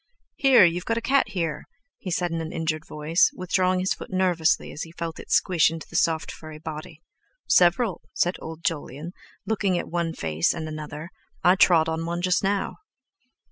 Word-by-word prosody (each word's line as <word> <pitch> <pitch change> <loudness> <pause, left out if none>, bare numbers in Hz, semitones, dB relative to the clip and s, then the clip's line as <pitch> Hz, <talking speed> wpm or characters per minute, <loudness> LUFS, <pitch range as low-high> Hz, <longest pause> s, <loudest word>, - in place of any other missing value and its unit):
"Here, 265 -8 +7
you've 175 +1 0
got 230 - 0
a - - +2
cat 270 +4 +2
here," 165 -5 -3 0.3
he 185 - -6
said 175 0 -1
in 165 0 -2
an 160 0 -5
injured 160 -1 -3
voice, 150 +3 +2
withdrawing 185 0 +1
his 190 - +1
foot - - -10
nervously 180 -3 +1
as - - -7
he 165 - -6
felt 170 -1 -5
it - - -11
squeezing 165 -3 +3
into 160 - -9
the - - -12
soft, 160 -1 +1
furry 155 -1 -10
body. 155 +1 -8 0.4
"Several," 185 +4 +3
said 175 +1 +1
old 160 +1 -8
Jolyon, 155 0 -3 0.3
looking 200 -4 0
at - - -3
one 170 -1 -1
face 80 0 0
and 160 -2 -5
another; 155 +2 -7 0.3
"I 180 - +6
trod 170 -4 +5
on 160 +1 -2
one 175 +1 -3
just 180 +1 +2
now." 195 0 -1
170 Hz, 185 wpm, -25 LUFS, 160-185 Hz, 0.4 s, Here